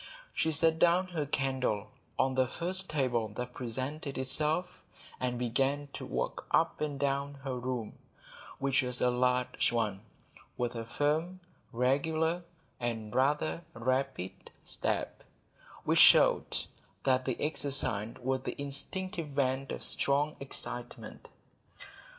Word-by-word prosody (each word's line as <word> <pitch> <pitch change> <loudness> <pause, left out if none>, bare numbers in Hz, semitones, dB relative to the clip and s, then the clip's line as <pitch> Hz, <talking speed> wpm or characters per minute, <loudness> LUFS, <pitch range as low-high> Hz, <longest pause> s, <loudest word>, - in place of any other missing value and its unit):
She 160 - +1
set 160 +1 +2
down 180 +2 +4
her 155 -5 -2
candle 130 -7 0 0.3
on 130 0 +2
the 130 0 +2
first 185 +7 0
table 125 -7 +1
that 125 +1 -4
presented 130 +5 -4
itself, 150 +6 0 0.4
and 125 -1 -1
began 135 +4 0
to - - -6
walk 60 0 -3
up - - +2
and 145 -2 -2
down 140 0 0
her 135 -2 -2
room, 125 -3 -4 0.6
which 135 +1 +2
was 125 -1 -3
a 125 - +3
large 125 0 +2
one, 105 -5 0 0.6
with 120 -1 -1
a 115 -1 -4
firm, 155 +8 0 0.3
regular, 155 +7 +1 0.4
and 115 -3 -3
rather 150 +5 +1
rapid 130 -4 -2
step, - - -2 0.6
which - - +3
showed - - +7 0.5
that 130 -1 +2
the 130 - -1
exercise 140 -8 +1
was 130 0 0
the - - -5
instinctive 160 +6 -2
vent 135 -1 0
of - - -4
strong 145 +2 +2
excitement. 125 -3 -5
135 Hz, 125 wpm, -31 LUFS, 125-150 Hz, 0.6 s, showed